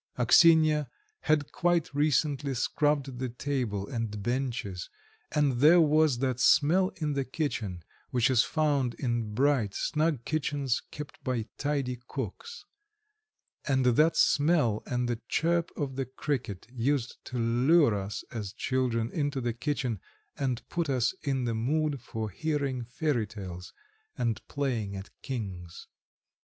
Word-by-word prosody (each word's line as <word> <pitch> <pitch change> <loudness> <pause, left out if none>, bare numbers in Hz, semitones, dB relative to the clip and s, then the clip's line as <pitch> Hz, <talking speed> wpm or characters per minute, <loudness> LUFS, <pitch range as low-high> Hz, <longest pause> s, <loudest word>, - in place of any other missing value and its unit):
Axinya 155 +3 +5 0.3
had 150 -2 +1
quite 175 -4 +1
recently 145 -1 +1
scrubbed 140 0 0
the 130 -1 -2
table 120 -6 -2
and 110 -4 -4
benches, 120 -6 -2 0.4
and 140 -5 +1
there 160 +6 +7
was 155 -4 +4
that 130 -1 -1
smell 170 +8 +4
in 150 -3 -2
the 140 -1 0
kitchen 120 - -3 0.3
which 125 +1 +2
is 125 -3 +5
found 145 -6 0
in 120 -5 -2
bright, 130 -6 +2
snug 150 -5 0
kitchens 145 -4 -1
kept 150 -1 -9
by 125 -4 -1
tidy 135 -4 -1
cooks. 135 - -6 1.0
And 130 -2 +2
that 150 +7 +4
smell 145 -8 +3
and 125 -1 -1
the 120 -1 -2
chirp 170 +1 +1
of 135 -4 -3
the 135 - -1
cricket 130 -7 -3
used 130 0 -1
to 125 - -5
lure 120 +4 +4
us 100 +1 -4
as 105 -4 -5
children 125 -3 -1
into 145 -3 -1
the 120 -2 -1
kitchen, 130 -4 -2 0.4
and 130 -4 -2
put 170 -3 -2
us 130 0 +1
in 135 -3 -1
the 115 -1 -1
mood 140 +4 0
for 110 -3 -5
hearing 140 - -2
fairy 125 -2 -1
tales 90 -4 -8 0.5
and 115 -2 -1
playing 120 -8 -2
at 95 0 -8
"Kings" 95 -9 -6
130 Hz, 135 wpm, -29 LUFS, 115-150 Hz, 1.0 s, there